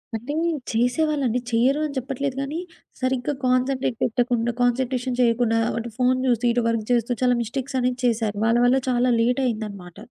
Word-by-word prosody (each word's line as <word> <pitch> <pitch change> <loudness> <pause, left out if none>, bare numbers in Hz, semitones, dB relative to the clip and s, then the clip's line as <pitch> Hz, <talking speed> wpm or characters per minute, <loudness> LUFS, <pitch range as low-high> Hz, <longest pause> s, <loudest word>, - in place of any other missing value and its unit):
అంటే, 240 +6 -4 0.4
చేసేవాళ్ళండి. 250 +1 +1
చెయ్యరు 255 +6 +3
అని 290 -2 -5
చెప్పట్లేదు 270 +1 -3
గానీ, 290 +5 -3 0.4
సరిగ్గా 255 +2 0
కాన్సంట్రేట్ 255 -1 +1
పెట్టకుండా 240 0 +1
కాన్సంట్రేషన్ 250 +1 0
చెయకుండా, 230 -1 +2 0.2
అటు 230 +1 -4
ఫోన్ 255 0 +2
జూసి, 245 -1 +1
ఇటు 240 - +1
వర్క్ 230 -2 -1
జేస్తూ, 240 0 +2
చాలా 250 -1 +3
మిస్టేక్సనేది 250 +1 -2
చేశారు. 220 -3 0
వాళ్ళ 230 +1 +3
వల్ల 250 +2 +4
చాలా 250 0 +2
లేటయిందనమాట. 220 -7 -1
245 Hz, 140 wpm, -23 LUFS, 230-260 Hz, 0.4 s, వల్ల